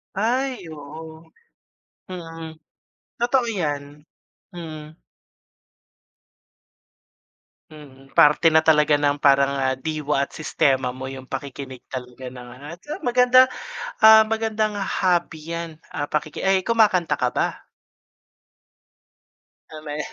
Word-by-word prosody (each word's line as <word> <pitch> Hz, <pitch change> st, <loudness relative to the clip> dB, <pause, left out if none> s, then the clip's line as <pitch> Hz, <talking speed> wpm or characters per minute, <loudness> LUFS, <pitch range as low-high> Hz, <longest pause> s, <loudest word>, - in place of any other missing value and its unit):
Ay! 240 Hz, 0 st, -1 dB
Oo, 160 Hz, +2 st, -10 dB, 0.9 s
mm. 165 Hz, -2 st, -8 dB, 0.7 s
Totoo 245 Hz, +1 st, +2 dB
yan. 150 Hz, -5 st, -4 dB, 0.5 s
Mm. 155 Hz, -2 st, -8 dB, 2.7 s
Mhm, 135 Hz, -3 st, -15 dB
parte 150 Hz, +3 st, +6 dB
na 160 Hz, 0 st, +3 dB
talaga 150 Hz, -1 st, +4 dB
ng 145 Hz, 0 st, 0 dB
parang, 140 Hz, 0 st, +4 dB
ah, 130 Hz, 0 st, 0 dB
diwa 150 Hz, -1 st, -1 dB
at -, -, -22 dB
sistema 135 Hz, -4 st, +1 dB
mo 130 Hz, +1 st, -7 dB
yung 130 Hz, -1 st, -8 dB
pakikinig 135 Hz, -2 st, -7 dB
talaga 125 Hz, 0 st, -8 dB
ng 125 Hz, -1 st, -9 dB, 0.2 s
at, 170 Hz, +3 st, -9 dB
ah, 305 Hz, -, -5 dB
maganda, 250 Hz, +1 st, +6 dB, 0.6 s
ah, 220 Hz, 0 st, +10 dB
magandang 220 Hz, -1 st, -1 dB
hobby 175 Hz, -5 st, -1 dB
yan, 170 Hz, 0 st, -5 dB, 0.2 s
ah, 145 Hz, -, -4 dB
pakiki 150 Hz, 0 st, -3 dB
ay, 190 Hz, 0 st, +3 dB
kumakanta 190 Hz, -8 st, +2 dB
ka 125 Hz, -2 st, -1 dB
ba? -, -, -2 dB, 2.0 s
Ah, 155 Hz, -1 st, -10 dB
may 150 Hz, 0 st, -5 dB
155 Hz, 105 wpm, -22 LUFS, 140-190 Hz, 2.7 s, ah